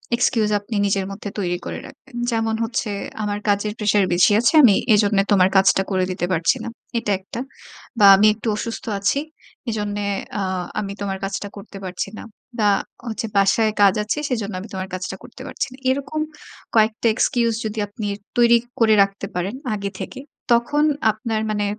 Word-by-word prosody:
Excuse 230 -3 +2
আপনি 205 +2 -7
নিজের 195 -1 0
মধ্যে 205 +1 -6
তৈরি 175 -2 -1
করে - - -5
রাখবেন। 270 -2 -15 0.2
যেমন 225 -1 0
হচ্ছে, 230 -1 -2 0.3
"আমার 205 0 -2
কাজের 205 +1 +1
প্রেশার 205 -2 +3
বেশি 175 +3 +5
আছে। 235 +5 +3
আমি 215 -6 +7 0.2
এজন্য 205 -1 +3
তোমার 190 -2 +5
কাজটা 195 0 +5
করে 185 -1 +1
দিতে 180 - -2
পারছি 165 -2 +2
না।" - - -4 0.3
এটা 210 -3 -2
১ 190 - -20
টা। 235 - -2 0.6
বা 205 - +7
আমি 205 +2 +5
একটু 220 +2 -7
অসুস্থ 225 +2 -5
আছি। 200 +8 +1 0.5
এজন্যে 205 -2 -2 0.3
আ - - -1 0.4
আমি 200 -1 -4
তোমার 195 -1 -2
কাজটা 195 +1 -3
করতে 200 0 -10
পারছি 185 +1 -4
না। - - -8 0.4
বা 210 -1 +4 0.4
হচ্ছে 225 0 -3
বাসায় 215 +3 +3
কাজ 200 -2 +6
আছে 210 - -2
সেজন্য 220 -5 -2
আমি 195 - -8
তোমার 190 0 -4
কাজটা 185 +1 -4
করতে 255 - -13
পারছি 275 - -3
না।" - - -13
এরকম 280 +3 -1 0.5
কয়েকটা 220 +1 +2
এক্সকিউজ 235 -2 +2
যদি 215 0 -3
আপনি 210 0 -5 0.3
তৈরি 235 0 +6 0.2
করে 225 -2 +5
রাখতে 195 0 -5
পারেন 185 +6 -2 0.2
আগে 200 -1 -3
থেকে। 265 - -6 0.3
তখন 240 +6 +3 0.3
আপনার 220 0 -3
মানে 210 -1 0
210 Hz, 175 wpm, -21 LUFS, 195-230 Hz, 0.6 s, আমি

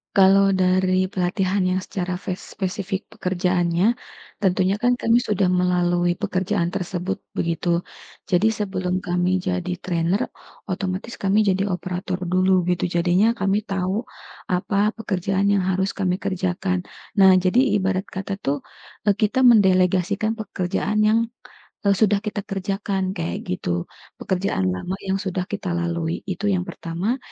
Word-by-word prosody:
Kalau 195 0 +6
dari 185 0 +3
pelatihan 185 +1 0
yang 185 - +1
secara 180 -1 -3
fes 185 0 -5 0.2
spesifik 190 +1 -3
pekerjaannya, 180 0 +1 0.5
tentunya 190 0 +2
kan 245 0 +3
kami 235 +1 +3
sudah 210 -5 +1
melalui 175 -1 +2
pekerjaan 185 -1 -1
tersebut 185 +2 -3 0.2
begitu. 170 +1 0 0.4
Jadi, 185 +5 +3
sebelum 190 -4 -2
kami 180 +1 +1
jadi 185 -1 -2
trainer 180 +5 0 0.4
otomatis 190 +3 -3
kami 200 +2 +2
jadi 195 -1 +2
operator 180 0 -3
dulu 185 0 +3
gitu, 175 +1 -2
jadinya 180 +7 +2
kami 200 +1 +1
tahu 195 0 -2 0.5
apa 200 +3 +1
pekerjaan 195 -2 -1
yang 200 - +3
harus 190 +1 0
kami 185 -2 0
kerjakan. 185 -1 -1 0.4
Nah, 190 -1 +8
jadi 185 +6 +3 0.2
ibarat 190 0 0
kata 195 +1 -4
tuh 140 0 -2 0.4
e - - +4
kita 215 +5 0
mendelegasikan 195 -1 +4
pekerjaan 210 -1 -2
yang 220 +1 +4 0.6
e 200 - +1
sudah 205 -2 +4
kita 210 0 -2
kerjakan, 195 0 -2
kayak 170 -1 -2 0.2
gitu. 85 -1 -3 0.3
Pekerjaan 180 - 0
lama 175 - -4
yang 195 0 -1
sudah 190 -1 -2
kita 190 -4 -3
lalui 170 -1 -2
itu 185 +3 -3
yang 180 - 0
pertama, 180 +10 -2
185 Hz, 135 wpm, -23 LUFS, 180-200 Hz, 0.6 s, Nah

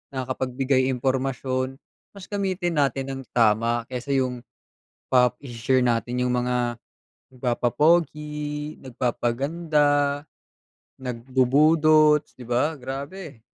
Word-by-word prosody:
nakakapagbigay 130 +1 0
impormasyon, 130 0 -1 0.4
mas 195 -2 -10
gamitin 185 -5 -1
natin 135 -1 0
ng 135 0 -5
tama 115 +1 +3
kaysa 130 +2 -2
yung 130 -2 0 0.7
pa 125 -1 +4
ise-share 130 0 0
natin 120 +1 0
yung 125 - 0
mga 125 -1 0 0.6
nagpapapogi, 150 +4 0
nagpapaganda, 145 +4 0 0.8
nagbubudots, 150 +5 +3
di 125 - -10
ba, 140 +6 0
grabe. 140 - -7
130 Hz, 90 wpm, -24 LUFS, 125-150 Hz, 0.8 s, pa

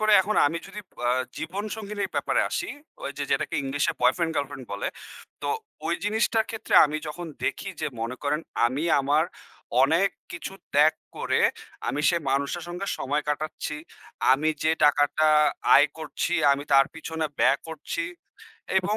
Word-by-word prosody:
করে 215 0 +3
এখন 210 +3 -1
আমি 165 +3 -1
যদি 210 - -8 0.3
আ - - +4 0.3
জীবনসঙ্গিনীর 205 +4 -4
ব্যাপারে - - +1
আসি, - - -2 0.4
ওইযে - - -3
যেটাকে - - 0
ইংলিশে 135 +1 0
বয়ফ্রেন্ড, 160 +7 +2
গার্লফ্রেন্ড 140 -2 -3
বলে। 100 - -2 0.5
তো - - -2 0.4
ওই - - +1
জিনিসটার 220 +1 +2
ক্ষেত্রে 225 -1 -3
আমি 150 +1 -1
যখন 175 +3 -6 0.2
দেখি 195 - -2
যে, - - 0
মনে 115 +3 -3
করেন, 150 +1 0 0.3
আমি 135 +7 -2 0.2
আমার 145 +3 +3 0.6
অনেক 165 +8 +4 0.2
কিছু 175 +2 -6 0.2
ত্যাগ 150 +2 +6 0.2
করে - - 0 0.5
আমি 145 - -1
সে - - +3
মানুষের 140 +5 0
সঙ্গে 180 +3 -4
সময় 145 +3 -1
কাটাচ্ছি। 150 0 -3 0.6
আমি 150 +4 +2
যে, 160 - +3
টাকাটা 145 +1 +4 0.5
আয় 145 - +7
করছি 160 +2 -3 0.2
আমি 140 +1 -2
তার 135 0 +7
পিছনে 160 -1 -4
ব্যয় - - +5 0.2
করছি 160 +1 -4 0.7
এবং 200 +3 -1
155 Hz, 150 wpm, -26 LUFS, 145-185 Hz, 0.7 s, আয়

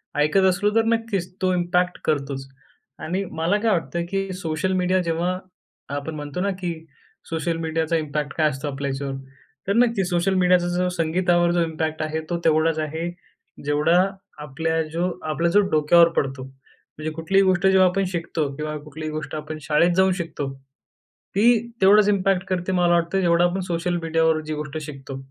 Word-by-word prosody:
ऐकत 150 +6 +3
असलो, 200 +3 +1
तर 225 - +4
नक्कीच 200 -6 -3
तो 185 -1 +2
इम्पॅक्ट 180 0 +1
करतोच. 140 -2 -1 0.5
आणि 185 +5 -2
मला 165 +5 +1
काय 225 0 +2
वाटतं, 170 -2 -1
की 195 0 -2
सोशल 175 0 -2
मीडिया 185 +1 +2
जेव्हा 175 +2 -1 0.6
आपण 145 +2 -4
म्हणतो 145 +3 -5
ना, 200 - +1
की 180 -2 -3 0.6
सोशल 165 +1 -1
मीडियाचा 160 0 -1
इम्पॅक्ट 150 -2 -3
काय 155 -2 +3
असतो 140 +1 -5
आपल्या 140 0 -3
याच्यावर? 135 0 -4 0.5
तर 200 - +2
नक्की 230 -4 +3
सोशल 175 +2 +1
मीडियाचा 180 -1 +3
जो 180 0 +1
संगीतावर 175 0 +1
जो 175 0 +2
इम्पॅक्ट 160 -1 -3
आहे, 155 0 -2
तो 175 - 0
तेवढाच 160 0 +3
आहे 160 +2 -3 0.6
जेवढा 150 +4 +3 0.4
आपल्या 160 +3 -1
जो 170 +3 0 0.2
आपला 165 +2 +1
जो 205 - +4
डोक्यावर 160 +2 +5
पडतो, 135 -1 -1
म्हणजे 135 +3 -10
कुठलीही 195 +5 +2
गोष्ट 185 -1 +2
जेव्हा 190 -1 +5
आपण 195 +2 0
शिकतो 165 -3 -2
किंवा 150 +1 -4
कुठलीही 155 +1 -6
गोष्ट 155 0 -5
आपण 155 0 -5
शाळेत 150 +5 +3
जाऊन 190 +1 +4
शिकतो, 165 -6 -4 0.9
ती 230 +3 +5 0.2
तेवढंच 205 +2 +6
इम्पॅक्ट 195 -2 +1
करते, 185 0 -1
मला 175 -2 +3
वाटतं 170 +2 +1
जेवढं 170 -1 +3
आपण 185 +2 -3
सोशल 175 +1 -1
मीडियावर 160 -1 +2
जी 155 - -2
गोष्ट 150 0 -5
शिकतो. 135 -3 -8
170 Hz, 170 wpm, -23 LUFS, 155-185 Hz, 0.9 s, तेवढंच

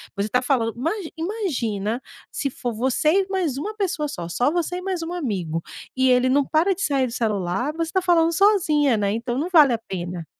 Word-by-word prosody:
você 200 +2 -2
tá 250 - +2
falando 245 -4 0
ima 295 +7 0 0.3
imagina 255 - -2 0.3
se 280 - -2
for 245 -2 -4
você 260 +6 +1
e - - -12
mais 350 -9 -1
uma 420 +9 -4
pessoa 355 -7 -1
só, 175 -12 -6
só 245 +10 +1
você 350 +1 -1
e 365 - -5
mais 370 -2 -3
um 330 - -5
amigo, 190 - -2 0.4
e 260 0 +3
ele 250 +1 +4
não 280 +1 +3
para 340 +5 +2
de 395 - -8
sair 270 -3 +1
do - - -7
celular, 215 +3 -1
você 330 - -2
está 375 +2 +1
falando 335 -2 +3
sozinha, 310 - +3
né, 200 -1 0
então 240 +2 -3
não 320 +5 -1
vale 295 -7 +6
a - - +1
pena. 180 -5 -6
270 Hz, 215 wpm, -23 LUFS, 225-335 Hz, 0.4 s, vale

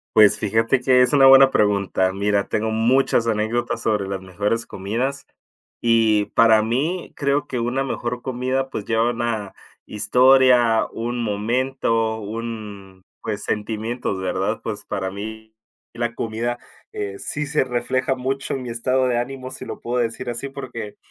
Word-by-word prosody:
Pues 105 -2 +7
fíjate 115 +4 +1
que 125 0 +4
es 125 - +3
una 140 -2 +6
buena 135 0 +8
pregunta. 100 -4 +1
Mira, 100 +1 0
tengo 110 +1 -1
muchas 115 +2 +2
anécdotas 115 +2 -1
sobre 105 -3 0
las 95 -1 -4
mejores 100 +5 -2
comidas, 120 +9 -3 0.6
y 115 -3 +3
para 110 -2 +5
mí 145 +11 -2
creo 140 +1 0
que 125 - -3
una 125 +3 -1
mejor 120 -2 -4
comida, 130 +1 -2
pues 105 - -5
lleva 115 +1 +2
una 115 -4 -3 0.3
historia, 125 +1 +4
un 120 +1 -3
momento, 115 +1 0
un 105 -3 -7 0.2
pues 105 -2 -4
sentimientos, 110 0 -3
¿verdad? 95 +3 -2
Pues 105 -2 -5
para 95 -2 -3
mí 110 +2 -8 0.4
la 120 0 -2
comida, 115 +2 -3 0.3
eh, 100 -1 -5
sí 150 0 -2
se 150 +1 +1
refleja 130 +1 -1
mucho 135 +2 -3
en 135 - -4
mi 125 - -6
estado 130 +3 0
de 120 -1 +1
ánimo, 130 +1 -5
si - - -7
lo - - -7
puedo 125 +1 -2
decir 115 +1 -4
así, 120 +3 -4
porque 125 -6 -7
115 Hz, 155 wpm, -22 LUFS, 105-130 Hz, 0.6 s, buena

